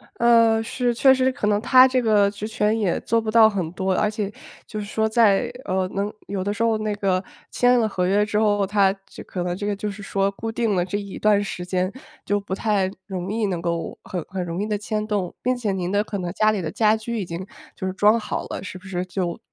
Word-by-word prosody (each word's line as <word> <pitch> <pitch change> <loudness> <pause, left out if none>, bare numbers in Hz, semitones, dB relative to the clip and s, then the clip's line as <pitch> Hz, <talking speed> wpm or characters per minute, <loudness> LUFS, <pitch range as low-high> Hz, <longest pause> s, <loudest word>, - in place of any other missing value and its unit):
呃， 230 -1 +4
是， 245 +1 -1
确 265 +3 +5
实 260 0 +2
可 255 -6 -2
能 210 0 +2
他 255 +1 +7
这 255 -1 +1
个 210 -3 +4
职 210 +1 -6
权 215 0 0
也 200 -6 0
做 230 0 +1
不 220 - -4
到 220 0 +7
很 180 -6 -3
多， 190 +1 -1
而 210 - +1
且， 210 -1 -3 0.3
就 215 - -6
是 205 - -4
说 220 +1 0
在， 225 +1 +3
呃， 185 -1 0
能 200 +2 -2 0.2
有 195 -2 -3
的 205 - -1
时 230 - -1
候 225 -1 +2
那 215 -1 -1
个 190 -2 0 0.3
签 245 0 +4
了 220 - +2
合 180 -3 -1
约 205 +2 +3
之 210 0 0
后， 205 -2 +2
它 195 -1 +3
这 - - -12
可 180 -2 -4
能 175 0 -2
这 205 +2 -4
个 205 - 0
就 205 +1 -4
是 205 +1 -10
说 195 0 0
固 225 +3 -5
定 225 -3 0
了 175 - +2
这 195 +3 -3
一 200 -1 -7
段 210 -1 +3
时 180 -3 -5
间 185 +1 -1 0.3
就 205 0 +1
不 195 -1 -4
太 200 -3 +1 0.2
容 190 -1 -4
易 220 -1 0
能 180 -4 -2
够， 170 -1 -3
很 180 -3 -4
很 185 -1 -4
容 175 +2 -4
易 - - -1
地 215 - -1
迁 215 0 -3
动， 200 -5 -2
并 255 +1 +1
且 225 -5 -2
您 185 -1 -2
的 205 +1 +2
可 210 -1 -5
能 175 -2 -3
家 215 0 +3
里 205 -3 -2
的 155 - -4
家 215 -1 +3
居 230 +1 -4
已 195 - -3
经 170 +2 -6 0.3
就 190 - -5
是 185 - -2
装 210 +4 +4
好 - - -4
了， - - -6
是 185 -1 -7
不 185 - -19
是 180 -1 -3
就， 180 -2 -3
205 Hz, 275 characters per minute, -23 LUFS, 190-220 Hz, 0.3 s, 他